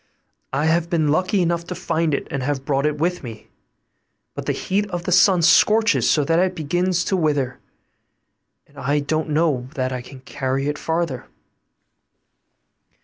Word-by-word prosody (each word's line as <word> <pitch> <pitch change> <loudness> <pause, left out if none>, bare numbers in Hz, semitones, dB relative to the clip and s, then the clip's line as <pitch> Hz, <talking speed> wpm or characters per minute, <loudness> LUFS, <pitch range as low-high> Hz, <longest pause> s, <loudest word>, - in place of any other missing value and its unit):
I 140 +3 0
have 165 +1 +1
been 160 -3 +1
lucky 185 +5 +1
enough 170 0 0
to 180 - -6
find 165 -3 0
it, - - -5
and 140 - -2
have 135 0 -2
brought 140 +1 +1
it 150 0 -2
with 175 +3 -1
me; 115 -4 -10 0.8
but - - -7
the - - +2
heat 205 +2 -1
of 175 -2 -4
the 180 - -3
sun 180 -1 +5
scorches 220 +6 +4
so 150 - +3
that 165 +4 +2
it 185 0 +1
begins 175 +3 0
to 195 - 0
wither, 145 -7 0 1.1
and 145 0 -16
I 140 +2 0
don't 155 +2 -2
know 150 -5 0
that 130 -2 -1
I 125 -1 -4
can 130 +1 -13
carry 135 +1 -3
it 150 0 -2
farther. 160 -6 -2
155 Hz, 170 wpm, -21 LUFS, 140-175 Hz, 1.1 s, sun